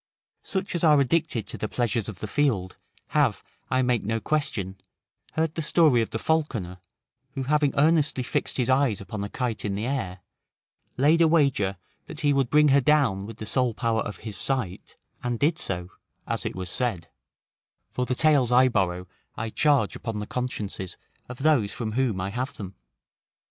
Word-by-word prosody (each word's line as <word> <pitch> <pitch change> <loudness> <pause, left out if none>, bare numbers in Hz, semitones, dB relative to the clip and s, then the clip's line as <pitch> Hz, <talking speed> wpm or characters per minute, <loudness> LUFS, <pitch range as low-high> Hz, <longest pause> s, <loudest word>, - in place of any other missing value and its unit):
Such 190 -1 -3
as 175 - -2
are 150 -3 +6
addicted 140 -3 +1
to - - -6
the 110 - -3
pleasures 115 -3 -1
of 95 -6 -9
the 110 - -3
field, 105 -9 0 0.3
have, - - +1 0.3
I 130 0 +2
make 125 -2 +1
no 115 +2 -1
question, 110 -10 -2 0.6
heard 160 -1 0
the 165 - -3
story 150 -6 +4
of 110 - -2
the - - -3
falconer, 115 - -1 0.5
who 135 - -3
having 145 +1 +2
earnestly 150 -3 +3
fixed - - -2
his 125 -3 +1
eyes 130 -5 +2
upon 100 +1 -5
a 100 - -4
kite 125 -2 -3
in 100 -2 -2
the 105 +3 -3
air; 100 -9 -3 0.8
laid 150 +6 +4
a 165 - +6
wager 135 - +2 0.3
that 160 0 -6
he 145 -2 +3
would 135 -3 +1
bring 150 +1 +5
her 140 +1 +5
down 125 -9 +2
with 115 - -9
the 110 - -6
sole 125 0 +1
power 115 -2 0
of 105 -3 -5
his 110 -3 -4
sight, 115 -9 -3 0.2
and 120 -1 -2
did 155 +7 +1
so, 90 - -2 0.3
as - - -2
it - - -5
was 90 -1 -4
said; 115 -10 -2 0.8
for 125 0 -2
the 125 - 0
tales 140 -4 +3
I 130 +1 +6
borrow 90 -5 0 0.3
I 110 0 -3
charge 140 -8 +2
upon 115 -2 -5
the 105 - -3
consciences 105 -7 -4 0.3
of 125 - -7
those 135 -10 +3
from 110 -3 -4
whom 120 -4 0
I 95 +2 -3
have 125 +5 -3
them. 95 -2 -7
125 Hz, 185 wpm, -26 LUFS, 105-145 Hz, 0.8 s, are